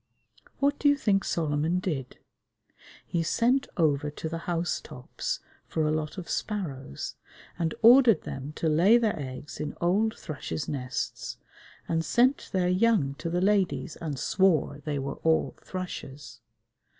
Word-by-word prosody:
What 285 Hz, +1 st, +1 dB
do 290 Hz, -, +4 dB
you 285 Hz, -, +4 dB
think 200 Hz, -7 st, +2 dB
Solomon 160 Hz, +1 st, 0 dB
did? 150 Hz, -9 st, -3 dB, 0.9 s
He 170 Hz, -, -1 dB
sent 245 Hz, +10 st, +2 dB
over 150 Hz, -3 st, +2 dB
to 150 Hz, +2 st, -6 dB
the 165 Hz, +1 st, -3 dB
house 170 Hz, 0 st, 0 dB
tops 125 Hz, -, -5 dB, 0.3 s
for 160 Hz, -1 st, 0 dB
a 150 Hz, -, +2 dB
lot 155 Hz, +3 st, -2 dB
of 180 Hz, -3 st, -6 dB
sparrows 140 Hz, -, -4 dB, 0.4 s
and 165 Hz, -2 st, 0 dB
ordered 235 Hz, -, +7 dB
them 135 Hz, +2 st, -6 dB
to 160 Hz, -, -2 dB
lay 175 Hz, +9 st, +5 dB
their 225 Hz, -3 st, +2 dB
eggs 130 Hz, -1 st, -7 dB
in 150 Hz, -, -4 dB
old 205 Hz, +6 st, +1 dB
thrushes' 130 Hz, -, -5 dB
nests 125 Hz, -3 st, -4 dB, 0.5 s
and 165 Hz, -1 st, 0 dB
sent 250 Hz, +9 st, +2 dB
their 185 Hz, -2 st, +1 dB
young 185 Hz, -6 st, +3 dB
to 165 Hz, -, -3 dB
the 175 Hz, +1 st, 0 dB
ladies 185 Hz, -9 st, +1 dB
and 150 Hz, -4 st, -4 dB
swore 165 Hz, -2 st, +2 dB
they 150 Hz, -2 st, -1 dB
were 135 Hz, 0 st, -4 dB
all 160 Hz, 0 st, +1 dB
thrushes! 150 Hz, -6 st, -7 dB
165 Hz, 150 wpm, -28 LUFS, 145-200 Hz, 0.9 s, ordered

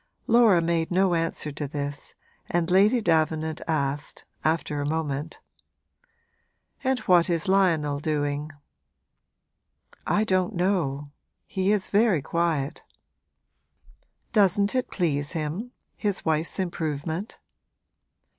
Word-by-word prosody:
Laura 225 Hz, -7 st, +5 dB
made 165 Hz, -1 st, 0 dB
no 185 Hz, 0 st, +2 dB
answer 165 Hz, -2 st, -2 dB
to 145 Hz, 0 st, -4 dB
this 145 Hz, 0 st, -5 dB, 0.3 s
and 175 Hz, 0 st, 0 dB
Lady 210 Hz, +6 st, +4 dB
Davenant 160 Hz, -3 st, +1 dB
asked, 145 Hz, -2 st, -2 dB, 0.2 s
after 155 Hz, -2 st, 0 dB
a -, -, -2 dB
moment: 155 Hz, -1 st, -3 dB, 1.4 s
'And 265 Hz, -1 st, +2 dB
what 175 Hz, -1 st, +4 dB
is 170 Hz, -1 st, 0 dB
Lionel 165 Hz, -7 st, +2 dB
doing?' 145 Hz, -1 st, -2 dB, 1.6 s
'I 210 Hz, -, +2 dB
don't 185 Hz, -4 st, 0 dB
know 160 Hz, -7 st, -1 dB, 0.3 s
he 190 Hz, +1 st, 0 dB
is 210 Hz, -3 st, 0 dB
very 205 Hz, -, +3 dB
quiet.' 160 Hz, -4 st, -1 dB, 1.5 s
'Doesn't 200 Hz, -1 st, +3 dB
it 255 Hz, -1 st, -1 dB
please 145 Hz, -5 st, -1 dB
him 165 Hz, +9 st, -3 dB, 0.3 s
his 205 Hz, -3 st, -2 dB
wife's 160 Hz, 0 st, +1 dB
improvement?' 165 Hz, 0 st, -3 dB
165 Hz, 105 wpm, -26 LUFS, 150-190 Hz, 1.6 s, Laura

